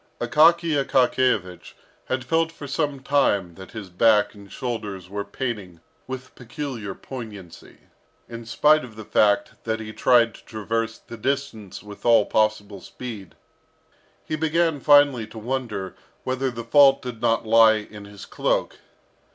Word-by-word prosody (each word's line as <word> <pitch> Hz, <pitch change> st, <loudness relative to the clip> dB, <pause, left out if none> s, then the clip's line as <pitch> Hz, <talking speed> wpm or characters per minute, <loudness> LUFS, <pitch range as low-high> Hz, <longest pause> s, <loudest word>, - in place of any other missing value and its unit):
Akaky 155 Hz, +4 st, +3 dB
Akakiyevich 125 Hz, -9 st, 0 dB, 0.3 s
had 130 Hz, 0 st, -2 dB
felt 165 Hz, +5 st, +1 dB
for 150 Hz, -, -10 dB
some 145 Hz, -1 st, -2 dB
time 105 Hz, -11 st, +1 dB
that 95 Hz, +6 st, -13 dB
his 105 Hz, -5 st, -8 dB
back 105 Hz, +2 st, +3 dB
and 100 Hz, -2 st, -15 dB
shoulders 105 Hz, -8 st, -5 dB
were 100 Hz, 0 st, -3 dB
paining 100 Hz, -6 st, -5 dB, 0.3 s
with 130 Hz, 0 st, -7 dB
peculiar 125 Hz, -5 st, -6 dB
poignancy, 105 Hz, -9 st, -10 dB, 0.5 s
in 115 Hz, 0 st, -8 dB
spite 150 Hz, +5 st, +3 dB
of 120 Hz, -4 st, -11 dB
the 110 Hz, -1 st, -9 dB
fact 100 Hz, 0 st, +1 dB
that 110 Hz, -1 st, -2 dB
he 110 Hz, -1 st, -7 dB
tried 120 Hz, -2 st, +3 dB
to -, -, -16 dB
traverse 115 Hz, +1 st, -3 dB
the 115 Hz, -, -12 dB
distance 130 Hz, -5 st, -4 dB
with 105 Hz, -1 st, -12 dB
all 115 Hz, -3 st, +5 dB
possible 105 Hz, -2 st, 0 dB
speed. 110 Hz, -7 st, -9 dB, 0.9 s
He 155 Hz, -, -2 dB
began 160 Hz, 0 st, +1 dB
finally 145 Hz, -5 st, +4 dB
to 110 Hz, -, -13 dB
wonder 110 Hz, -5 st, -4 dB, 0.3 s
whether 130 Hz, +1 st, -1 dB
the 120 Hz, -2 st, -7 dB
fault 135 Hz, +3 st, +5 dB
did 120 Hz, -3 st, -7 dB
not 115 Hz, -1 st, +1 dB
lie 110 Hz, 0 st, +6 dB
in 105 Hz, -1 st, -8 dB
his 100 Hz, -1 st, -11 dB
cloak. -, -, -1 dB
115 Hz, 145 wpm, -23 LUFS, 105-135 Hz, 0.9 s, lie